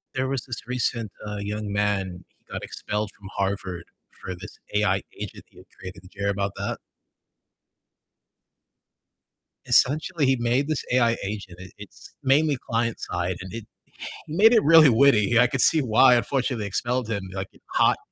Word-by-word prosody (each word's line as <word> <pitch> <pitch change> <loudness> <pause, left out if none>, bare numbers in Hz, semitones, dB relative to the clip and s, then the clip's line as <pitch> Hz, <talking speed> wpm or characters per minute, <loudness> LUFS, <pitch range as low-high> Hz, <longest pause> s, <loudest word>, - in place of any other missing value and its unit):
There 130 0 0
was 135 -2 -2
this 120 -2 -7
recent, 120 -4 -2 0.2
uh, 105 0 -4
young 105 0 -4
man, 95 -4 -1
he - - -42
got - - -5
expelled 105 0 -4
from 95 -1 -11
Harvard 95 -3 -2 0.3
for 95 - -8
this 90 - -11 0.2
AI - - +2 0.2
agent - - -7
he - - -24
had - - -15
created. 90 -1 -9
Did 90 - -17
you - - -9
hear 100 - +1
about 100 0 -1
that? 100 0 -3 2.9
Essentially, 155 +3 +2
he 130 -1 +3
made 120 +5 +1
this 155 -4 -2
AI 120 -2 +3
agent. 100 -3 -6
It 90 -1 -11
it's 105 +1 -13
mainly 145 +1 +3
client 115 0 0
side, 90 +1 -3
and 95 0 -9
it 115 -1 -6 0.6
he 155 - -6
made 225 +5 +6
it 225 - +5
really 160 -1 +8
witty, 120 -3 +4
I 125 - +6
could 130 +2 -3
see 160 - +4
why, 125 +1 +5
unfortunately, 125 -2 -1
they - - -3
expelled 120 +4 -2
him. 100 -3 -2
Be 95 - -11
like, 95 0 -4
it - - -23
hot - - +4
110 Hz, 180 wpm, -24 LUFS, 100-130 Hz, 2.9 s, really